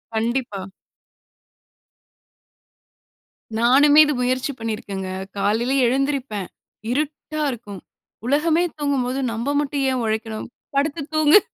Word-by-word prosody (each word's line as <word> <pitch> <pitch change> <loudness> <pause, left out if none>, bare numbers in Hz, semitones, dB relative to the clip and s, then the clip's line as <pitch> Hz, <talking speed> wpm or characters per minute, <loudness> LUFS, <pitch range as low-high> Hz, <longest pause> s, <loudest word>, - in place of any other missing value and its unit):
கண்டிப்பா. 225 -4 -1 2.9
நானுமே 275 +6 +6
இது 295 - 0
முயற்சி 255 +2 0
பண்ணிருக்கேன்ங்க. 205 -4 -4 0.3
காலையில 225 +6 +1
எழுந்திரிப்பேன். 265 -6 -1 0.4
இருட்டா 305 +2 -2
இருக்கும். 210 -6 -8 0.5
உலகமே 315 +5 +3
தூங்கும்போது 275 -3 0
நம்ப 230 +4 -2
மட்டும் 280 -1 -1
ஏன் 255 -2 -1
உழைக்கணும். 220 0 -3 0.3
படுத்து 290 +2 +1
தூங்கு. 310 +5 +7
255 Hz, 90 wpm, -22 LUFS, 225-290 Hz, 2.9 s, தூங்கு